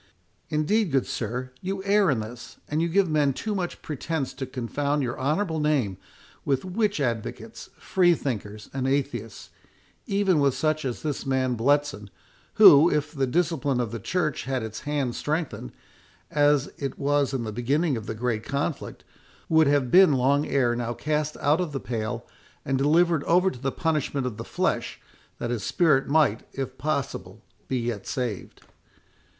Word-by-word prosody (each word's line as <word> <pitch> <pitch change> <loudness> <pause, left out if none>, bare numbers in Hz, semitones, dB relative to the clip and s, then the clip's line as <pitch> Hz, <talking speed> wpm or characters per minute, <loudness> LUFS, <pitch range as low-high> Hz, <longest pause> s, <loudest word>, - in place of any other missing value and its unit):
Indeed, 170 +6 +1
good 135 -2 +2
sir, 125 +3 -4
you 190 +1 -3
err 200 -1 +3
in 125 -6 +1
this, 120 +3 -9
and 160 +3 0
give 195 +1 +3
men 150 -3 +2
too 215 - -3
much 180 -3 -4
pretence 150 -1 -3
to 130 - -5
confound 140 +3 -1
your 120 -1 -3
honourable 160 +4 0
name 140 -11 +1 0.5
with 135 +2 0
witch 205 0 0
advocates, 120 -5 -4
free 175 -2 +3
thinkers, 105 -7 -5
and 130 -1 -1
atheists, 120 -6 -2 0.6
even 195 -4 +2
with 140 -2 +2
such 155 -1 0
as 125 -3 -4
this 150 -3 -2
man 130 -1 0
Bletson, 140 -2 +1 0.5
who, 150 +4 +9
if 150 -1 -1
the 135 -3 0
discipline 150 -3 0
of 120 -3 -1
the 115 - -4
church 155 - -1
had 130 -2 -2
its 110 0 -6
hand 140 -5 0
strengthened, 150 - -3 0.6
as 145 -1 +3
it 135 -2 -4
was 145 -1 +1
in 130 -3 -2
the 110 - -4
beginning 140 +7 0
of 110 -2 -6
the 110 - -4
great 115 -1 -2
conflict, 140 +4 -3 0.5
would 160 -2 +5
have 140 -3 +2
been 185 -5 +7
long 140 +3 +2
ere 125 -4 +2
now 120 0 -3
cast 150 +1 -2
out 150 +5 +2
of 165 -5 -3
the 135 - -2
pale, 115 0 -4 0.4
and 135 0 0
delivered 160 +2 +3
over 180 +3 +3
to 125 - -10
the 135 +1 -1
punishment 150 -4 -1
of 120 -4 -4
the 115 - -5
flesh, - - -2 0.4
that 120 - -3
his 120 -3 -2
spirit 150 - +2
might, 140 -7 +3
if 130 -1 -4
possible, 140 0 -3 0.2
be 130 - -1
yet 115 -4 -3
saved." 120 -7 -4
140 Hz, 165 wpm, -26 LUFS, 125-155 Hz, 0.6 s, who